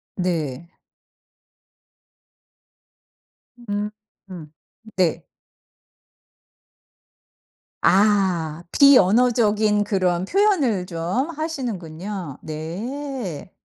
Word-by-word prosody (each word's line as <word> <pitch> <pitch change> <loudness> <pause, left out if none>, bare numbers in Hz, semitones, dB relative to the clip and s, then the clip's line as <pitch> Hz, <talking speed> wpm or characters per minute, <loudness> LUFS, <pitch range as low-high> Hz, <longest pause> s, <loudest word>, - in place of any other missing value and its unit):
네. 170 -4 -3 2.9
음음 205 -7 -7 0.4
네. 180 -4 +1 2.6
아. 185 -5 +2
비언어적인 215 -4 +4
그런 185 -3 0
표현을 290 - +2
좀 180 - -2
하시는군요. 200 - -5
네. 190 - -6
195 Hz, 95 characters per minute, -22 LUFS, 170-240 Hz, 2.9 s, 비언어적인